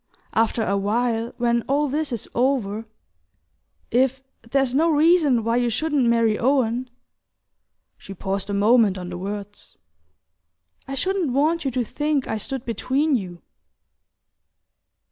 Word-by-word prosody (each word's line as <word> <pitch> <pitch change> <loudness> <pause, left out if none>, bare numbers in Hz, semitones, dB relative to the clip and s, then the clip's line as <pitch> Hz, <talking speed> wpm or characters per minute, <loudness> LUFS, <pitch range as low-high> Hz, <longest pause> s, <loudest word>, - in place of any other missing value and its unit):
after 225 0 +1
a 200 - 0
while, 230 +3 0
when 235 -1 +1
all 290 +2 +1
this 295 +1 -2
is 235 -4 -4
over... 230 -4 0 1.0
if 260 +2 +2 0.3
there's 270 -1 +1
no 320 +5 +3
reason 305 -5 +4
why 230 +1 0
you 245 0 +2
shouldn't 285 +1 0
marry 230 -2 +2
Owen 250 -1 +1 0.5
" - - -54
she 195 - -10
paused 195 +1 -3
a - - -2
moment 210 -1 +4
on 180 -1 -6
the 180 - -6
words 205 +1 -7 1.1
"I 270 - -4
shouldn't 365 -1 -1
want 310 +4 +1
you - - +2
to 255 -1 -1
think 295 +2 -1
I 220 - -2
stood 265 +4 -5
between 265 +6 0
you..." 180 -7 -5
245 Hz, 140 wpm, -23 LUFS, 220-275 Hz, 1.1 s, reason